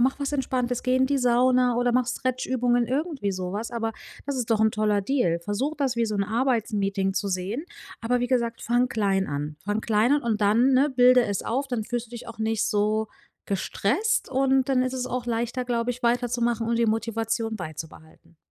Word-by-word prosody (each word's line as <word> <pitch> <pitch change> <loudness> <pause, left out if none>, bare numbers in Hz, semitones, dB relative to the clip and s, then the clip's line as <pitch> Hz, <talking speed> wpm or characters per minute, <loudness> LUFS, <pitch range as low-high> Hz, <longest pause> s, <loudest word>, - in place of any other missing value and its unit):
mache 260 +3 +2
was 280 +1 -2
Entspanntes, 250 -3 -1
gehe 255 0 +2
in 260 - +3
die 280 +1 +1
Sauna 250 0 +3
oder 245 0 +2
mache 250 0 +2
Stretch-Übungen, 250 -2 0
irgendwie 275 - -2
so 185 -1 -4
was, 220 +4 -4
aber 225 -1 -2 0.3
das 280 -2 -2
ist 240 -2 -3
doch 220 -1 +3
'n 220 0 +4
toller 210 -1 +1
Deal. 195 -8 +1
Versuche, 205 - -2
das 265 -4 -1
wie 230 - +1
so 215 - -3
'n 200 - +1
Arbeitsmeeting 210 -4 0
zu 200 - -1
sehen, 195 - -3 0.4
aber, 245 +2 0
wie 245 - 0
gesagt, 235 -2 -1
fange 245 +2 +2
klein 195 -4 0
an. 145 +1 -4
Fange 205 +2 -1
klein 220 +4 +2
an 290 - +2
und 220 -2 -1
dann, 230 +6 +4
ne, 275 +3 +4
bilde 250 -1 +5
es 200 -2 -2
auf, 270 +4 -2
dann 235 -4 -2
fühlst 240 +1 -3
du 225 - -25
dich 240 -1 -8
auch 230 - -10
nicht 220 -1 0
so 215 +1 0 0.4
gestresst 230 - 0
und 265 0 +2
dann 260 -2 +3
ist 255 0 -1
es 255 -1 -2
auch 250 -1 -3
leichter, 240 +2 -2
glaube 240 -1 -1
ich, 250 +1 -7
weiterzumachen 240 -1 0
und 230 0 +1
die 235 - +3
Motivation 225 0 -1
beizubehalten. 160 -1 -10
235 Hz, 210 wpm, -25 LUFS, 215-255 Hz, 0.4 s, bilde